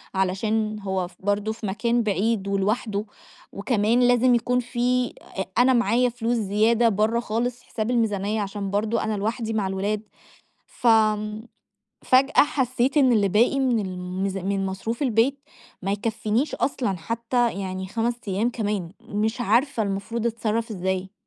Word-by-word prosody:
علشان 215 Hz, +3 st, 0 dB
هو 190 Hz, -2 st, -2 dB
ف -, -, -18 dB
برضو 205 Hz, +2 st, -1 dB
في 225 Hz, -1 st, -8 dB
مكان 235 Hz, +4 st, 0 dB
بعيد 205 Hz, 0 st, 0 dB
ولوحدُه، 205 Hz, +1 st, -1 dB, 0.5 s
وكمان 215 Hz, +2 st, +1 dB
لازم 245 Hz, 0 st, +4 dB
يكون 250 Hz, +1 st, +1 dB
فيه 250 Hz, 0 st, 0 dB
أ 190 Hz, -, -5 dB
أنا 255 Hz, +1 st, +5 dB
معايا 245 Hz, +1 st, +3 dB
فلوس 235 Hz, 0 st, -1 dB
زيادة 220 Hz, +3 st, +3 dB
برّا 220 Hz, +3 st, +1 dB
خالص 240 Hz, +2 st, -2 dB
حساب 220 Hz, +2 st, -3 dB
الميزانية 215 Hz, -2 st, 0 dB
عشان 200 Hz, 0 st, -4 dB
برضو 215 Hz, +3 st, 0 dB
أنا 215 Hz, -1 st, -1 dB
لوحدي 225 Hz, +2 st, -2 dB
مع 205 Hz, -3 st, 0 dB
الولاد، 200 Hz, +2 st, -1 dB, 0.7 s
ف -, -, -6 dB
آمم، 215 Hz, -1 st, +2 dB, 0.6 s
فجأة 265 Hz, +2 st, +4 dB
حسيت 260 Hz, 0 st, 0 dB
إن 260 Hz, -4 st, +5 dB
اللي 205 Hz, -3 st, +3 dB
باقي 235 Hz, +8 st, +3 dB
من 245 Hz, -4 st, +2 dB
الميز 185 Hz, +1 st, -3 dB
من 195 Hz, +1 st, -1 dB
مصروف 220 Hz, +7 st, -4 dB
البيت 255 Hz, +2 st, +2 dB, 0.4 s
ما 195 Hz, +1 st, -1 dB
يكفينيش 220 Hz, +5 st, -1 dB
أصلًا، 240 Hz, -8 st, -1 dB
حتى 235 Hz, +5 st, 0 dB
يعني 190 Hz, 0 st, -4 dB
5 230 Hz, +3 st, -1 dB
أيام 205 Hz, +5 st, +1 dB
كمان، 205 Hz, -7 st, -2 dB
مش 220 Hz, +1 st, -2 dB
عارفة 235 Hz, +2 st, +2 dB
المفروض 205 Hz, +4 st, -2 dB
أتصرف 230 Hz, 0 st, -1 dB
إزاي؟ 190 Hz, -1 st, -2 dB
220 Hz, 145 wpm, -24 LUFS, 200-240 Hz, 0.7 s, أنا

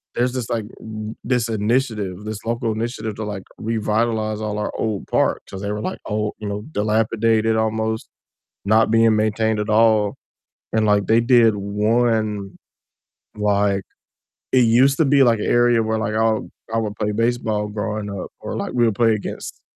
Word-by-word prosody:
there's 125 Hz, +1 st, +1 dB
this, 125 Hz, -3 st, -4 dB
like, 115 Hz, -3 st, -1 dB, 0.2 s
r 110 Hz, 0 st, -6 dB
this 120 Hz, -2 st, 0 dB
initiative, 105 Hz, -3 st, -1 dB
this 110 Hz, -1 st, -5 dB
local 115 Hz, -1 st, -1 dB
initiative 110 Hz, -1 st, -4 dB
to, 110 Hz, -, -5 dB
like, 100 Hz, -2 st, -5 dB, 0.2 s
revitalize 110 Hz, -1 st, -1 dB
all 105 Hz, -1 st, -3 dB
our 105 Hz, -, -2 dB
old 110 Hz, -3 st, -2 dB
parks, -, -, +1 dB
'cause 95 Hz, 0 st, -7 dB
they 100 Hz, 0 st, -3 dB
were, 105 Hz, 0 st, -3 dB
like, -, -, -9 dB
old, 105 Hz, 0 st, -2 dB
you 105 Hz, -, -5 dB
know, 105 Hz, +1 st, -4 dB
dilapidated 110 Hz, +1 st, +1 dB
almost, 110 Hz, 0 st, -1 dB, 0.6 s
not 110 Hz, +2 st, +3 dB
being 115 Hz, -1 st, +4 dB
maintained 110 Hz, 0 st, +1 dB
at 105 Hz, +1 st, -2 dB
all, 110 Hz, -2 st, +3 dB, 0.6 s
and, 110 Hz, -1 st, +2 dB
like, 105 Hz, -1 st, +3 dB
they 115 Hz, +1 st, +4 dB
did 115 Hz, -3 st, +5 dB
one, 105 Hz, 0 st, 0 dB, 0.8 s
like 100 Hz, -1 st, +1 dB, 0.7 s
it 130 Hz, -, +6 dB, 0.2 s
used 135 Hz, +1 st, +4 dB
to 160 Hz, -, +4 dB
be, 140 Hz, 0 st, +4 dB
like, 115 Hz, -3 st, +3 dB
a -, -, -2 dB, 0.2 s
area 120 Hz, -2 st, +4 dB
where, 110 Hz, 0 st, -1 dB
like, 110 Hz, 0 st, -2 dB
I 110 Hz, -1 st, +2 dB, 0.3 s
I -, -, +1 dB
would 105 Hz, -2 st, -3 dB
play 105 Hz, -1 st, -1 dB
baseball 110 Hz, -2 st, 0 dB
growing 105 Hz, 0 st, -4 dB
up 100 Hz, -2 st, -6 dB
or, -, -, -5 dB
like, -, -, -3 dB
we 120 Hz, -1 st, +3 dB
would 110 Hz, -3 st, +1 dB
play 115 Hz, 0 st, +3 dB
against 105 Hz, -, -7 dB
110 Hz, 175 wpm, -21 LUFS, 105-115 Hz, 0.8 s, it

